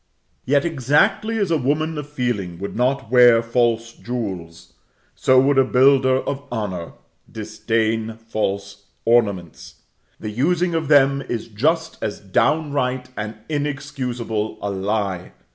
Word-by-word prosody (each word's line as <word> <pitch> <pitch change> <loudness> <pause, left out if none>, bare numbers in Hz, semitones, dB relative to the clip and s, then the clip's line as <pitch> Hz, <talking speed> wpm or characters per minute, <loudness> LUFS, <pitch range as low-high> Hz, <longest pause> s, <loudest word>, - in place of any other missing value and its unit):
Yet 140 +2 +2
exactly 170 - +2
as 200 -5 0
a 160 - +2
woman 155 +5 0
of 145 0 -7
feeling 120 -11 -2
would 100 +3 -6
not 125 -1 0
wear 120 -2 +6
false 115 -1 0
jewels, 95 -9 -6 0.4
so 130 0 +4
would 135 +1 +3
a - - +6
builder 130 0 +4
of 140 0 -4
honor 95 -7 -4 0.4
disdain 110 +1 -2
false 100 -3 -4 0.2
ornaments. 100 -8 0 0.4
The 110 - -5
using 175 +9 +1
of 160 -2 -1
them 140 -1 +4
is 115 -1 -3
just 160 +9 0
as 105 - -3
downright 130 - 0
and 110 +1 -5
inexcusable 135 -7 -3
a 100 - -3
lie. 100 -2 -2
120 Hz, 125 wpm, -21 LUFS, 110-140 Hz, 0.4 s, wear